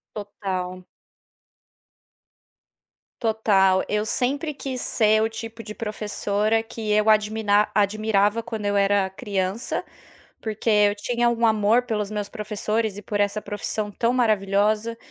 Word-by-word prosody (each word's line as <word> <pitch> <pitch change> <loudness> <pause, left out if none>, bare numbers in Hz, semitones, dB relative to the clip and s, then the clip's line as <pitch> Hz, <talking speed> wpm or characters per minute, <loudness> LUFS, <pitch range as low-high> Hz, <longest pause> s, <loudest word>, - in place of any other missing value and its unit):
Total. 185 -3 -5 2.4
Total! 200 -4 +3
Eu 210 0 0
sempre 280 +7 -1
quis 260 -2 -5
ser 215 -1 +3
o 225 - +1
tipo 225 0 -8
de 215 - -7
professora 210 0 -1
que 225 -1 -5
eu 215 +1 +3
adimina 210 -1 +3
admirava 210 +1 +2
quando 220 -3 -5
eu 205 - +1
era 200 -1 +2
criança, 195 +1 -3 0.6
porque 220 +1 -2
eu 210 -1 +4
tinha 240 +3 0
um 235 0 0
amor 220 +2 +3
pelos 215 -4 -2
meus 210 -1 -3
professores 210 0 -2
e 205 - -8
por 205 +1 -3
essa 205 +1 0
profissão 205 0 -3
tão 230 +4 0
maravilhosa, 215 -1 +1
215 Hz, 125 wpm, -24 LUFS, 205-225 Hz, 2.4 s, eu